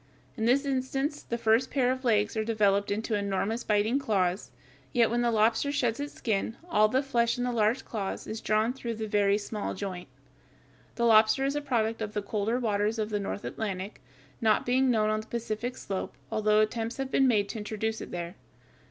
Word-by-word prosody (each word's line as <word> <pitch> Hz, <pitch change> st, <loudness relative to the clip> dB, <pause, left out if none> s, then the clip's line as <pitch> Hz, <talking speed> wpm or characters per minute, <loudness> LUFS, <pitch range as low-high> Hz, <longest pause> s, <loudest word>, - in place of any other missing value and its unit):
In 220 Hz, -, -2 dB
this 270 Hz, +4 st, +3 dB
instance 270 Hz, +2 st, -1 dB
the 235 Hz, -, -4 dB
first 230 Hz, +2 st, +2 dB
pair 255 Hz, -3 st, +2 dB
of 260 Hz, +1 st, -4 dB
legs 215 Hz, -3 st, +2 dB
are 220 Hz, -, 0 dB
developed 205 Hz, -2 st, +2 dB
into 220 Hz, +2 st, -2 dB
enormous 205 Hz, +3 st, -1 dB
biting 215 Hz, +5 st, +2 dB
claws; 190 Hz, -7 st, 0 dB, 0.4 s
yet 230 Hz, -2 st, +3 dB
when 240 Hz, 0 st, +1 dB
the 240 Hz, -, +2 dB
lobster 225 Hz, +5 st, +2 dB
sheds 245 Hz, -5 st, 0 dB
its 290 Hz, 0 st, -5 dB
skin 220 Hz, 0 st, -2 dB
all 215 Hz, -11 st, +4 dB
the 260 Hz, +5 st, +1 dB
flesh 235 Hz, -4 st, +1 dB
in 245 Hz, -, -1 dB
the 250 Hz, -, 0 dB
large 230 Hz, +2 st, +1 dB
claws 200 Hz, -4 st, -4 dB
is 220 Hz, +1 st, -5 dB
drawn 215 Hz, +3 st, +1 dB
through 235 Hz, -3 st, -5 dB
the 220 Hz, 0 st, -4 dB
very 205 Hz, -1 st, +3 dB
small 210 Hz, 0 st, -4 dB
joint. 185 Hz, -3 st, -5 dB, 0.9 s
The 235 Hz, -, +1 dB
lobster 220 Hz, +3 st, +5 dB
is 275 Hz, +1 st, 0 dB
a 295 Hz, -, -1 dB
product 230 Hz, -5 st, -1 dB
of 210 Hz, -1 st, -3 dB
the 210 Hz, -, -1 dB
colder 215 Hz, +3 st, -1 dB
waters 215 Hz, -2 st, 0 dB
of 215 Hz, 0 st, -2 dB
the 205 Hz, -, 0 dB
North 200 Hz, 0 st, -4 dB
Atlantic, 200 Hz, -2 st, -4 dB, 0.4 s
not 220 Hz, -2 st, +3 dB
being 260 Hz, +1 st, +3 dB
known 215 Hz, -3 st, +2 dB
on 215 Hz, 0 st, 0 dB
the 220 Hz, -, -15 dB
Pacific 235 Hz, +1 st, -3 dB
slope, 195 Hz, -1 st, -4 dB, 0.2 s
although 215 Hz, 0 st, +3 dB
attempts 225 Hz, +1 st, -1 dB
have 270 Hz, -1 st, -3 dB
been 270 Hz, -, +4 dB
made 210 Hz, -5 st, +2 dB
to 225 Hz, -, -4 dB
introduce 220 Hz, +1 st, -3 dB
it -, -, -7 dB
there. 175 Hz, 0 st, -5 dB
220 Hz, 205 wpm, -28 LUFS, 210-245 Hz, 0.9 s, lobster